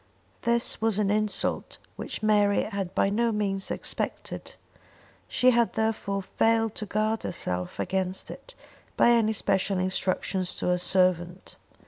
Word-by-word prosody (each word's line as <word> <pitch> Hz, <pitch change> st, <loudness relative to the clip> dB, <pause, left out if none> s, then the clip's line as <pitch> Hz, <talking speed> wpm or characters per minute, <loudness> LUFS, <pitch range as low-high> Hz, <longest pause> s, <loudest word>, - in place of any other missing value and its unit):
This 235 Hz, -1 st, 0 dB
was 220 Hz, -2 st, +1 dB
an 205 Hz, -2 st, +1 dB
insult 215 Hz, 0 st, 0 dB, 0.2 s
which -, -, -6 dB
Mary 205 Hz, -1 st, +3 dB
had 200 Hz, -4 st, -4 dB
by 195 Hz, -, +2 dB
no 230 Hz, +3 st, +1 dB
means 195 Hz, -2 st, -1 dB
expected; -, -, -4 dB, 0.7 s
she 255 Hz, 0 st, +4 dB
had 235 Hz, -1 st, +2 dB
therefore 215 Hz, -3 st, -1 dB
failed 225 Hz, +2 st, +1 dB
to 210 Hz, -, -4 dB
guard 215 Hz, +2 st, 0 dB
herself 90 Hz, -, -3 dB
against 190 Hz, 0 st, -2 dB
it -, -, -12 dB, 0.4 s
by 240 Hz, -, +5 dB
any 225 Hz, -2 st, +3 dB
special 195 Hz, -2 st, 0 dB
instructions 185 Hz, 0 st, -1 dB
to -, -, -3 dB
her 180 Hz, 0 st, +2 dB
servant. 180 Hz, -1 st, +1 dB
205 Hz, 135 wpm, -27 LUFS, 190-220 Hz, 0.7 s, by